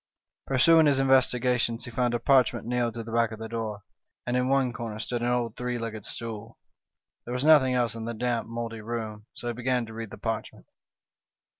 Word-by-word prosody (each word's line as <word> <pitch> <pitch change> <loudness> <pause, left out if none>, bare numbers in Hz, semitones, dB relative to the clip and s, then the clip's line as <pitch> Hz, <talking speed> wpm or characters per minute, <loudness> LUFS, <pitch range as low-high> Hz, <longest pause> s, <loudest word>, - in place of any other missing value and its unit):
Pursuing 160 +4 +5
his 140 -2 +3
investi 130 -2 +4
gations, 120 -2 +1
he 120 - -8
found 120 0 0
a - - 0
parchment 130 -2 +3
nailed 120 -1 -1
to 115 - -4
the 115 - -8
back 115 -1 +2
of 110 - -6
the 110 +1 -6
door, 110 -3 -4 0.4
and 120 - -1
in 125 0 +1
one 135 -2 +2
corner 115 -3 -5
stood 120 +2 -3
an 120 - 0
old 120 -2 0
three 125 0 -3
legged 110 -3 -5
stool. 115 -1 -7 0.7
There 120 - -5
was 125 +3 -1
nothing 140 -5 +6
else 120 -3 +1
in 115 -1 -6
the 115 0 -4
damp, 120 0 -1
mouldy 115 -1 -5
room, 110 -1 -5
so - - -9
he - - -2
began 125 0 0
to 110 - -11
read 115 -1 -6
the - - -10
parchment. 110 -1 -4
120 Hz, 210 wpm, -27 LUFS, 115-125 Hz, 0.7 s, nothing